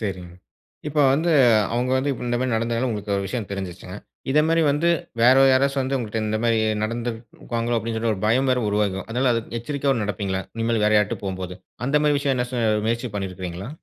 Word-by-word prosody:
சரிங்க. 95 -5 -5 0.6
இப்ப 150 +1 0
வந்து 165 +4 +1 0.4
அவுங்க 125 +1 0
வந்து, 140 +2 0 0.2
இந்த 120 0 0
மாரி 130 - 0
நடந்ததால 115 +2 0
உங்களுக்கு 105 -2 -3
ஒரு 100 - -2
விஷயம் 105 +1 -4
தெரிஞ்சுருச்சுங்க. 95 -1 -6 0.3
இத 150 +2 +4
மாரி 165 0 +3
வந்து 155 +4 +1 0.3
வேற 130 +2 +7 0.2
யாராச்சும் 135 +1 +2
வந்து 135 +1 -1
உங்கள்ட்ட, 110 -1 -3
இந்த 110 0 0
மாரி 115 -1 +3 0.2
நடந்துக்குவாங்களோ 115 +1 -3
அப்டினு 115 +1 -4
சொல்லி 115 0 0
ஒரு 95 - -8
பயம் 130 +4 +2
வேற 125 -1 +2
உருவாகும். 100 -2 0
அதுனால 125 +2 +1
அது 115 - -1 0.2
எச்சரிக்கையாவும் 135 -2 -1
நடப்பீங்களா, 95 -1 -2
இனிமேல் 115 -1 0
வேற 105 - +3
யார்கிட்டயாவது 105 0 -1
போகும்போது. 95 -1 -5 0.3
அந்த 150 +2 +3
மாரி 145 -1 +3
விஷயம் 140 -2 0
எதுனாச்சும் 120 -4 0
முயற்சி 115 +1 -1
பண்ணிருக்கிங்களா? 95 +1 -5
115 Hz, 180 wpm, -23 LUFS, 105-130 Hz, 0.6 s, வேற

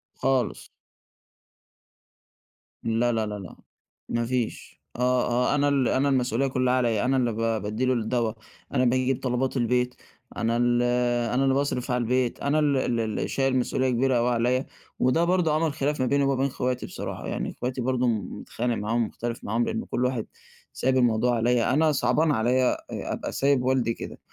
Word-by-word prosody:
خالص. 130 -3 -1 2.1
لا 115 +2 +1
لا 110 -2 0
لا 105 -1 -5
لأ 90 - -10 0.5
ما 115 0 0
فيش، 125 -1 -3
آه 125 - -5 0.5
آه - - +2
أنا 145 0 +2
ال 135 -3 +2
أنا 140 +2 +2
المسؤولية 130 0 +1
كلها 130 -1 +1
عليَّا، 120 -3 +1
أنا 130 +1 +2
اللي 120 -2 +1
ب 110 - -7
بادّي 110 +1 -1
له 130 - +2
الدوا، 115 -1 0 0.4
أنا 130 -1 +2
باجيب 130 +1 +1
طلبات 130 +1 0
البيت، 125 +1 +1 0.4
أنا 115 +1 0
ال 120 0 +2 0.5
أنا 135 +2 +2
اللي 135 -1 +3
باصرف 135 -2 -1
على 125 0 +1
البيت، 125 +1 0
أنا 145 +2 +1
ال 145 -3 +2
ال 120 -2 0
اللي 110 -1 -2
شايل 135 -1 0
مسؤولية 130 +1 0
كبيرة 125 +1 +2
أوي 120 +1 +2
عليَّا، 125 +2 +1 0.3
وده 145 +7 +3
برضه 175 -3 +2
عمَل 155 -1 +1
خِلاف 145 +1 -1
ما - - +2
بيني 140 +3 +2
ومابين 135 0 +1
اخواتي 125 -2 -2
بصراحة، - - -6
يعني - - -3
اخواتي 125 +1 -4
برضه 125 0 +1
متخانق 115 +1 -2
معاهم، 115 +3 0
مُختلف 120 0 -5
معاهم، 115 +3 0
لأنه 225 +1 -3
كل 125 - -1
واحد 125 -3 -1 0.5
سايب 130 0 +1
الموضوع 120 0 +2
عليَّا، 120 +2 +2
أنا 155 +2 +3
صعبان 150 +3 +2
عليَّا 125 +1 +2
آآ - - -6
أبقى - - -4
سايب 140 -2 +2
والدي 130 -3 +1
كده، - - -8
125 Hz, 175 wpm, -26 LUFS, 120-135 Hz, 2.1 s, اللي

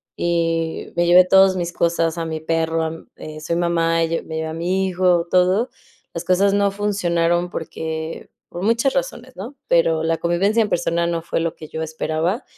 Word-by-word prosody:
Y 165 -1 -1
me 175 0 +2
llevé 180 +1 +7
todos 190 0 +5
mis 170 -1 -2
cosas, 170 -1 0
a 165 - -2
mi 160 -1 -4
perro, 165 0 -1
a 160 0 -5
eh, 155 0 -8
soy 170 +2 -2
mamá, 165 -1 +1
yo 165 0 -2
me 160 - -7
llevé 160 - -2
a 160 - -5
mi 185 +3 -1
hijo, 180 -2 +2
todo. 185 +7 +3 0.4
Las 170 - -4
cosas 195 +2 +3
no 200 -1 +2
funcionaron 175 -4 0
porque, 160 0 -5 0.2
por 175 +2 -6
muchas 230 +5 +2
razones, 260 -1 -4
¿no?, 235 +9 -8
pero 165 -1 +2
la 165 0 0
convivencia 195 +7 +1
en 210 - 0
persona 170 0 0
no 170 -1 -1
fue 170 - -2
lo 165 -1 -2
que 155 - -10
yo 160 0 -4
esperaba, 160 - -2
170 Hz, 190 wpm, -21 LUFS, 165-185 Hz, 0.4 s, llevé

